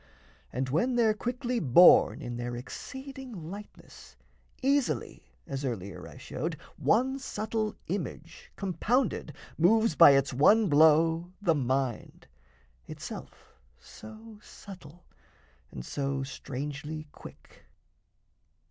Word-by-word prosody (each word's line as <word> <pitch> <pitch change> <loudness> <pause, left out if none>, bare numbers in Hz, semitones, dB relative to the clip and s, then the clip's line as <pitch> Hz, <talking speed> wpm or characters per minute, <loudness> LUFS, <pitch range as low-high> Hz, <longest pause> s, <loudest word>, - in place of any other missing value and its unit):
And 130 +2 -2
when 240 - +1
they're 225 -3 +3
quickly 245 +2 -3
borne 165 - +6
In 120 0 -5
their 120 0 -4
exceeding 255 - -8
lightness, 205 +1 -12 0.5
easily 275 0 -1 0.2
(As 135 0 -5
earlier 100 - -5
I - - -13
showed) - - -4 0.2
one 260 +5 +1
subtle 220 -3 -3
image, 485 0 -6
Compounded, 200 - -1 0.3
moves 220 +4 +4
by 140 +1 +8
its 135 -1 0
one 205 - +4
blow 160 +3 +4
the 185 -5 +2
mind, 130 -3 -2 0.6
Itself - - -10 0.2
so 220 -1 -13
subtle 180 -6 -13 0.6
and 60 - -8
so 135 - -2
strangely 145 +3 -6
quick. - - -15
170 Hz, 105 wpm, -29 LUFS, 140-225 Hz, 0.6 s, by